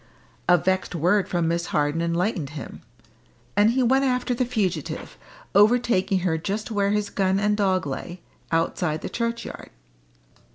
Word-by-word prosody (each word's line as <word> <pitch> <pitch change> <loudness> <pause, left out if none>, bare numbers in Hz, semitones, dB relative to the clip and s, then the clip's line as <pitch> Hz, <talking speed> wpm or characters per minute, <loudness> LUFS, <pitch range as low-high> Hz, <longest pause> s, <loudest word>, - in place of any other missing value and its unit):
A 175 - +7
vexed 185 +1 -1
word 180 +5 +2
from 175 -2 0
Miss 170 +1 -1
Harden 150 +2 0
enlightened 170 -2 -1
him, 140 - -8 0.7
and 205 +2 +5
he 255 +2 +2
went 265 +3 +3
after 250 -1 0
the 250 +1 0
fugitive, 195 - -2 0.4
overtaking 205 -3 +3
her 165 -3 0
just 205 +7 -3
where 200 -2 +1
his 210 0 0
gun 190 0 +1
and 210 0 +2
dog 190 -4 +1
lay, 170 +6 -5 0.3
outside 165 -1 0
the - - -3
churchyard. 235 0 -4
190 Hz, 150 wpm, -24 LUFS, 170-215 Hz, 0.7 s, A